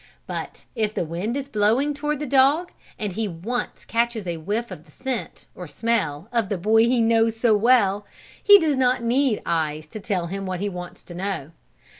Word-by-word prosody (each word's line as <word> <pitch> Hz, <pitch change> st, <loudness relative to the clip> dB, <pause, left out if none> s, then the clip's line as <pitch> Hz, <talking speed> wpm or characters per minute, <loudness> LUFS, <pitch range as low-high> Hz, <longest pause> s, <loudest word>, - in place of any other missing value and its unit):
But -, -, -6 dB
if 215 Hz, -3 st, -1 dB
the -, -, -1 dB
wind 180 Hz, -, -3 dB
is 275 Hz, -1 st, -4 dB
blowing 235 Hz, +5 st, +2 dB
toward 295 Hz, +1 st, -2 dB
the 295 Hz, -, -4 dB
dog, 280 Hz, +6 st, +3 dB, 0.3 s
and 210 Hz, -3 st, -3 dB
he 220 Hz, +2 st, -2 dB
once 205 Hz, +8 st, -4 dB
catches 230 Hz, -2 st, 0 dB
a 170 Hz, -2 st, -3 dB
whiff 210 Hz, +9 st, -3 dB
of 150 Hz, -, -9 dB
the 155 Hz, -, -21 dB
scent, 255 Hz, -, -5 dB
or 180 Hz, -, -8 dB
smell, 160 Hz, -1 st, -1 dB
of 230 Hz, -5 st, 0 dB
the 200 Hz, -, -1 dB
boy 220 Hz, +5 st, +4 dB
he 245 Hz, 0 st, +2 dB
knows 225 Hz, 0 st, +3 dB
so 225 Hz, -2 st, +4 dB
well, 205 Hz, -3 st, +3 dB, 0.4 s
he 410 Hz, -1 st, +9 dB
does 310 Hz, -4 st, +1 dB
not 250 Hz, -1 st, +2 dB
need 245 Hz, -1 st, +1 dB
eyes 155 Hz, -2 st, -1 dB
to 215 Hz, -, -7 dB
tell 195 Hz, -3 st, -2 dB
him 195 Hz, +2 st, -5 dB
what 185 Hz, -1 st, -3 dB
he 205 Hz, +2 st, -1 dB
wants 180 Hz, -2 st, -8 dB
to 175 Hz, -, -11 dB
know. 180 Hz, -5 st, -4 dB
220 Hz, 200 wpm, -23 LUFS, 185-245 Hz, 0.4 s, he